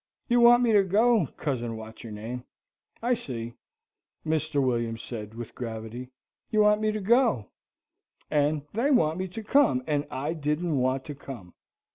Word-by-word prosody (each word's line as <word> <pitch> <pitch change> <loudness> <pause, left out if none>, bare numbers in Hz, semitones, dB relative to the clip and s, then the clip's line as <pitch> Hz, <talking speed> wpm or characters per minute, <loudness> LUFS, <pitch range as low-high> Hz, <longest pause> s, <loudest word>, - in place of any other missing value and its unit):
"You 240 -1 +3
want 240 +1 +7
me 235 - +3
to 205 -2 +6
go, 210 - +3
Cousin 120 -5 -2
What's 110 0 -10
your 115 - -8
name, 115 +4 -6 0.6
I 245 +1 +3
see," 120 - -4 0.7
Mr. 155 -1 0
William 120 -3 0
said, 110 -2 -7
with 120 0 -7
gravity. 115 +1 -6 0.4
"You 215 -2 +3
want 210 0 +4
me 215 0 +2
to 215 - -3
go, 205 - +2 0.8
and 150 0 +2
they 235 +7 +1
want 165 - +3
me 190 - -2
to 220 +5 -7
come, 225 - +3
and 145 -1 -1
I 145 +5 -3
didn't 150 0 -1
want 130 +1 0
to 145 - -6
come. 130 -10 -10
145 Hz, 165 wpm, -27 LUFS, -, 0.8 s, want